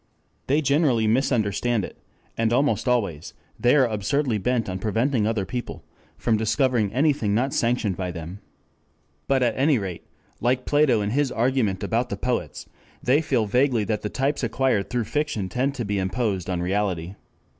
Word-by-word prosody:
They 145 Hz, +4 st, +2 dB
generally 140 Hz, -5 st, +2 dB
misunderstand 115 Hz, -2 st, +1 dB
it, -, -, -11 dB, 0.4 s
and 115 Hz, 0 st, +1 dB
almost 140 Hz, +2 st, +1 dB
always 100 Hz, -11 st, -1 dB, 0.2 s
they 125 Hz, +4 st, +4 dB
are 135 Hz, -3 st, +5 dB
absurdly 115 Hz, +2 st, 0 dB
bent 120 Hz, +2 st, 0 dB
on 95 Hz, -1 st, -4 dB
preventing 110 Hz, +2 st, +1 dB
other 110 Hz, -4 st, -1 dB
people 120 Hz, +4 st, -6 dB, 0.3 s
from 115 Hz, -2 st, +1 dB
discovering 110 Hz, 0 st, +1 dB
anything 135 Hz, -6 st, +1 dB
not 130 Hz, +4 st, 0 dB
sanctioned 115 Hz, -6 st, 0 dB
by 90 Hz, -1 st, -3 dB
them. 85 Hz, +2 st, -7 dB, 0.9 s
But 135 Hz, -2 st, +2 dB
at 120 Hz, -2 st, +1 dB
any 140 Hz, +1 st, +3 dB
rate, 95 Hz, -5 st, -6 dB, 0.3 s
like 125 Hz, +2 st, 0 dB
Plato 145 Hz, -7 st, +3 dB
in 100 Hz, 0 st, -1 dB
his 140 Hz, +1 st, +1 dB
argument 115 Hz, -6 st, 0 dB
about 120 Hz, +2 st, 0 dB
the 100 Hz, -, -3 dB
poets, 125 Hz, +3 st, -3 dB, 0.4 s
they 135 Hz, +5 st, +3 dB
feel 130 Hz, -8 st, +1 dB
vaguely 125 Hz, +1 st, +2 dB
that 105 Hz, 0 st, -2 dB
the 105 Hz, -, -3 dB
types 140 Hz, +4 st, -1 dB
acquired 115 Hz, -3 st, 0 dB
through 120 Hz, -1 st, -1 dB
fiction 145 Hz, -6 st, -2 dB
tend 135 Hz, +5 st, -1 dB
to 120 Hz, -4 st, -3 dB
be 100 Hz, 0 st, -1 dB
imposed 95 Hz, -1 st, -1 dB
on 90 Hz, -1 st, -1 dB
reality. 95 Hz, -2 st, -1 dB
115 Hz, 165 wpm, -24 LUFS, 100-130 Hz, 0.9 s, are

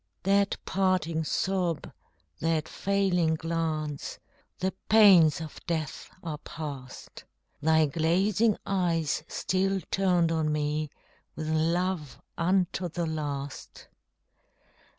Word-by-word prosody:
That 200 Hz, +1 st, +2 dB
parting 185 Hz, -4 st, +1 dB
sob, 180 Hz, 0 st, -1 dB, 0.5 s
that 160 Hz, -1 st, 0 dB
failing 185 Hz, -5 st, +1 dB
glance 160 Hz, -3 st, -3 dB, 0.4 s
The 190 Hz, +1 st, -1 dB, 0.2 s
pains 195 Hz, -8 st, +7 dB
of 160 Hz, -2 st, -8 dB
death 160 Hz, -4 st, -3 dB
are 155 Hz, -3 st, -4 dB
past! 140 Hz, -5 st, -8 dB, 0.4 s
Thy 160 Hz, +1 st, +4 dB
glazing 185 Hz, +8 st, +2 dB
eyes 165 Hz, -6 st, 0 dB
still 190 Hz, +1 st, 0 dB
turned 180 Hz, -4 st, +2 dB
on 160 Hz, -2 st, +1 dB
me 150 Hz, 0 st, -1 dB, 0.5 s
With 155 Hz, 0 st, -4 dB
love 165 Hz, -1 st, 0 dB, 0.2 s
unto 180 Hz, 0 st, +1 dB
the 170 Hz, +1 st, -2 dB
last! 145 Hz, -3 st, -5 dB
165 Hz, 95 wpm, -28 LUFS, 155-185 Hz, 0.5 s, pains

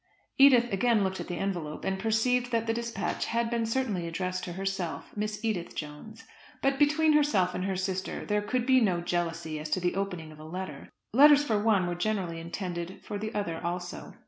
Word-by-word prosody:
Edith 245 Hz, -5 st, +6 dB
again 220 Hz, +1 st, +3 dB
looked 190 Hz, 0 st, -2 dB
at -, -, -5 dB
the 175 Hz, -, -4 dB
envelope 175 Hz, -6 st, -3 dB
and 190 Hz, 0 st, -1 dB
perceived 240 Hz, +4 st, +1 dB
that 230 Hz, -1 st, +1 dB
the 225 Hz, -, +1 dB
despatch 230 Hz, -5 st, -2 dB
had 230 Hz, 0 st, -1 dB
been 230 Hz, -1 st, 0 dB
certainly 225 Hz, -8 st, -1 dB
addressed 185 Hz, +2 st, -3 dB
to 175 Hz, -, -5 dB
herself 190 Hz, -5 st, -4 dB
Miss 210 Hz, +1 st, -3 dB
Edith 195 Hz, -6 st, -2 dB
Jones; 155 Hz, +9 st, -8 dB, 0.4 s
but 270 Hz, 0 st, +2 dB
between 305 Hz, +1 st, +4 dB
herself 215 Hz, -12 st, +3 dB
and 185 Hz, -, -2 dB
her 195 Hz, -1 st, -1 dB
sister 190 Hz, 0 st, -3 dB
there 210 Hz, 0 st, +1 dB
could 240 Hz, +4 st, -1 dB
be 260 Hz, 0 st, +5 dB
no 185 Hz, -6 st, +2 dB
jealousy 170 Hz, -2 st, -2 dB
as 155 Hz, 0 st, -5 dB
to 185 Hz, -, +1 dB
the 175 Hz, 0 st, 0 dB
opening 180 Hz, -5 st, -3 dB
of 155 Hz, -, -14 dB
a -, -, -10 dB
letter. 160 Hz, -3 st, -6 dB, 0.2 s
Letters 290 Hz, +3 st, +8 dB
for 220 Hz, -7 st, +1 dB
one 210 Hz, -4 st, +3 dB
were 175 Hz, -, -1 dB
generally 175 Hz, -2 st, -2 dB
intended 175 Hz, +1 st, -5 dB
for 205 Hz, -, -5 dB
the 215 Hz, +1 st, -4 dB
other 170 Hz, -6 st, -2 dB
also. 175 Hz, +1 st, -5 dB
195 Hz, 200 wpm, -29 LUFS, 175-230 Hz, 0.4 s, Letters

